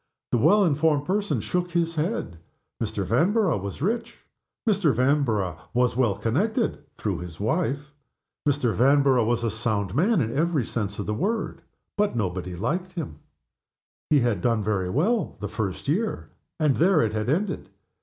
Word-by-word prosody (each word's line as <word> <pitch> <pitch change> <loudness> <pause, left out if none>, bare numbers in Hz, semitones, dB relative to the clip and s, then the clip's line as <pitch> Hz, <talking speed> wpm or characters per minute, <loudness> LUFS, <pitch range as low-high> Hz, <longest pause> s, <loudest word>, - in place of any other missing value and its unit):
The 120 - +2
well 205 - +5
informed 150 -2 +2
person 200 +3 0
shook 180 0 -1
his 170 -1 0
head. 155 - -2 0.4
Mr. 105 -3 -2
Vanborough 170 - +2
was 100 +7 -5
rich; 230 +4 -2 0.4
Mr. 200 -8 +3
Vanborough 120 - +1 0.2
was 125 -1 +2
well 120 -6 +2
connected 200 - 0
(through 100 -5 -2
his 85 -3 -8
wife); 145 - -1 0.6
Mr. 130 -5 +1
Van 140 +4 +4
borough 130 -4 +4
was 120 0 +1
a 115 - 0
sound 105 -4 -1
man 190 - +3
in 115 -3 -1
every 155 -4 +1
sense 100 -3 -3
of 105 - -3
the 105 - -1
word; 205 - -2 0.4
but 210 -7 +2
nobody 90 -4 -2
liked 175 - -2
him. 145 - -6 0.9
He 150 -3 +5
had 115 -7 +1
done 115 -1 +1
very 95 -3 0
well 185 - 0
the 105 - -3
first 100 0 -4
year, 205 +10 -1 0.3
and 150 -4 +2
there 170 -1 +4
it 110 - -1
had 110 +2 -1
ended. 185 +9 -1
135 Hz, 165 wpm, -25 LUFS, 110-175 Hz, 0.9 s, well